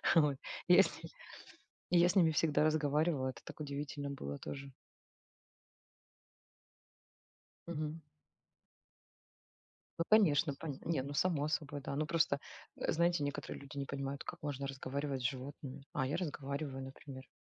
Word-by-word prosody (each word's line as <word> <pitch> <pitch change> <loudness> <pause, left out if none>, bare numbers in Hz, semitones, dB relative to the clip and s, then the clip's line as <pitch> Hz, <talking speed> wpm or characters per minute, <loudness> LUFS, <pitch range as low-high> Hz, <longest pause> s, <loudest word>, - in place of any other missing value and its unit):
Вот, 150 -4 +5 0.3
и - - +8
я - - +9
с - - -3
ними, - - -9 0.8
я 175 0 +6
с 180 - 0
ними 170 -4 +6
всегда 150 0 +3
разговаривала, 155 -2 +2
это 130 - -8
так - - -10
удивительно 145 -1 -3
было 70 - -4
тоже. 140 - -7 2.9
Мгм. 155 -1 -3 2.0
Ну - - +3
конечно, 170 -8 +5
поня 145 -2 -5
Не, 160 -6 +1
ну 140 +1 -5
само 150 -2 +2
собой, 145 -2 -2
да. 140 - -3
Ну 155 +2 +1
просто, 160 -3 +2 0.4
э, - - 0
знаете, 170 -2 +3
некоторые 145 0 -3
люди 140 +1 -10
не 140 - -1
понимают, 140 0 -3
как - - -7
можно 140 -3 -3
разговаривать 135 0 -3
с - - -3
животными. 135 +1 -7
А, 130 - +1
я 140 - 0
разговариваю, 140 -4 -3
например. 135 0 -9
145 Hz, 140 wpm, -35 LUFS, 140-155 Hz, 2.9 s, я